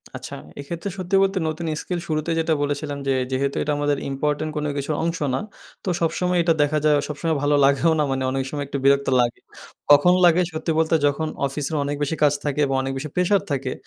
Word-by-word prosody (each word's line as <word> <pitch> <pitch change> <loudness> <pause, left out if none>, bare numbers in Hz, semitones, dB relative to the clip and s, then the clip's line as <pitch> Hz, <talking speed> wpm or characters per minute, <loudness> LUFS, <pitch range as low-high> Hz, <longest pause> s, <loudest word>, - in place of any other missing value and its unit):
আচ্ছা - - -7 0.2
এক্ষেত্রে 170 +7 -5
সত্যি 185 +1 -1
বলতে, 195 0 0
নতুন 160 +2 -3 0.2
স্কিল 180 -2 -3
শুরুতেই 155 +1 -1
যেটা 160 0 +1
বলেছিলাম 145 0 -2
যে, - - +2 0.2
যেহেতু 135 +1 -1
এটা 150 - -1
আমাদের 145 -1 0
ইম্পোর্টেন্ট 150 +3 -1
কোনো 150 0 -1
কিছুর 145 +2 -2
অংশ 165 0 -1 0.2
না - - -1 0.4
তো 190 - -2
সবসময় 180 +2 0
এটা 165 -1 +3
দেখা 145 +1 +2
যায় 150 -1 +5
সবসময় 155 +2 -2
ভালো 145 0 +3
লাগেও 140 +4 +3
না - - +3
মানে 135 0 -1
অনেক 135 0 -1
সময় 145 -1 -3
একটু 140 - -3
বিরক্ত 140 0 +4
লাগে। 120 0 -1 0.5
কখন 180 +5 +7
লাগে 175 +1 +5
সত্যি 160 +1 -3
বলতে 160 0 +2
যখন 155 +2 -1 0.2
অফিসের 140 +2 -3
অনেক 145 +1 -2
বেশি 155 +3 -1
কাজ 145 - +5
থাকে 145 0 -2
এবং 135 - -1
অনেক 135 - -3
বেশি 150 +3 -5
প্রেশার 180 +2 +3
থাকে 135 -2 -1
150 Hz, 210 wpm, -23 LUFS, 140-165 Hz, 0.5 s, কখন